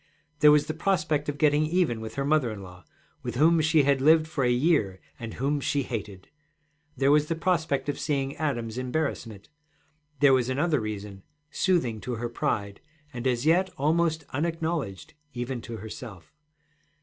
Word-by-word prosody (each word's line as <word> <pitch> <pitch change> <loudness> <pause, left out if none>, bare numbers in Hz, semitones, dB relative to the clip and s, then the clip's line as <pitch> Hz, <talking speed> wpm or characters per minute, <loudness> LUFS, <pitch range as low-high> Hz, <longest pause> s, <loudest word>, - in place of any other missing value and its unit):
There 150 -1 +7
was 150 -1 +4
the 155 - -3
prospect 155 -4 0
of 145 - -3
getting 150 0 +3
even 160 -9 0
with 110 0 -7
her 135 - -1
mother 145 -4 +2
in 105 -3 -7
law, 90 -1 -13 0.4
with - - -5
whom 160 +5 +4
she 155 -1 +3
had 140 -1 +2
lived 155 +2 +5
for 155 -4 -2
a 125 - +3
year 120 - +2 0.2
and 115 -2 -7
whom 140 +3 0
she 140 0 0
hated; 105 -6 -6 0.7
there 135 +2 +3
was 150 0 +4
the 165 - -1
prospect 160 -6 0
of 145 - -2
seeing 140 -2 -1
Adam's 120 -6 -2
embarrassment; 125 -6 -3 0.7
there 145 -2 +6
was 130 -1 +2
another 150 +3 +1
reason, 105 -2 -6 0.3
soothing 125 - 0
to 125 - -4
her 120 +1 -4
pride, 100 -4 -2 0.3
and 120 +1 -3
as 125 +1 0
yet 180 +4 +3
almost 160 +2 +1
unacknowledged, 160 - -3 0.2
even 120 0 -4
to 115 0 -7
herself. 105 -5 -10
140 Hz, 170 wpm, -27 LUFS, 115-155 Hz, 0.7 s, There